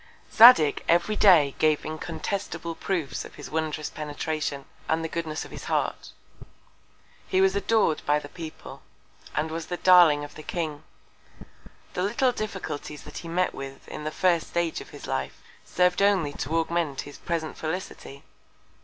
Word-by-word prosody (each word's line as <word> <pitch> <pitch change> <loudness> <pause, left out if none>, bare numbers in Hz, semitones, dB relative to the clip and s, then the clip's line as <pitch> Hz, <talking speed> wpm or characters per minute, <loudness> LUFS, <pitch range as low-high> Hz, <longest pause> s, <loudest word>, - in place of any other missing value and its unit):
Zadig 225 - +8
every 175 +5 +3
Day 165 -10 +6
gave 155 -1 +2
incontestable 165 +2 -4
Proofs 165 -7 -3
of - - -12
his - - -10
wondrous 155 -1 -2
Penetration, 150 -1 -4 0.2
and 160 +1 +1
the - - -1
Goodness 160 -1 -4
of - - -13
his - - -8
Heart; - - -1 1.2
he 185 - +1
was 190 0 +4
ador'd 200 -5 +1
by 145 0 +2
the 150 - -6
People, 160 +1 -9 0.5
and 155 +1 -1
was 165 0 -5
the 175 - -3
Darling 175 -6 +6
of 145 - -9
the - - -10
King. 155 -2 -4 1.1
The - - -2
little 235 +7 +2
Difficulties 195 -10 -5
that - - -8
he 170 - -9
met 180 +2 0
with 135 0 -9
in - - -7
the 155 - -2
first 170 0 +1
Stage 170 -1 -1
of - - -12
his - - -10
Life, 65 0 -3 0.2
serv'd 180 +1 +1
only 190 -8 +3
to 160 +3 -2
augment 165 -4 -1
his 145 - -11
present 165 -2 -3
Felicity. 155 -4 -6
160 Hz, 160 wpm, -26 LUFS, 150-180 Hz, 1.2 s, Zadig